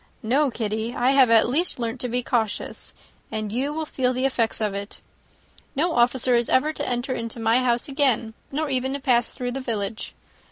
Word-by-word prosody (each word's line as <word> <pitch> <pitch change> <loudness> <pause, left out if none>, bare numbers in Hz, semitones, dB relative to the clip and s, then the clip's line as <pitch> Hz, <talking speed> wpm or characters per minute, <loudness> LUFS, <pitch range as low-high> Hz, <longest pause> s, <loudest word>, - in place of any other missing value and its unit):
No, 270 +6 +2
Kitty, 220 0 -3
I 250 +2 +3
have 270 -3 +5
at 225 -1 +5
least 315 +9 +1
learnt 235 0 -3
to 250 - -1
be 245 +1 0
cautious, 225 -4 -2 0.4
and 215 -2 -3
you 260 +6 -1
will 315 +1 -3
feel 255 -4 0
the 255 +1 -1
effects 235 -4 0
of 210 -2 -1
it. 200 +1 -6 0.8
No 330 +5 +1
officer 245 0 +3
is 235 -1 +2
ever 300 +4 +2
to 290 - -3
enter 245 -2 -3
my 225 +2 +3
house 240 -1 +1
again, 265 -6 +1 0.2
nor 305 +3 -1
even 265 -1 -1
to 280 - -3
pass 245 -4 +2
through 245 -1 -4
the 270 +2 -4
village. 220 -3 -4
245 Hz, 195 wpm, -24 LUFS, 230-270 Hz, 0.8 s, have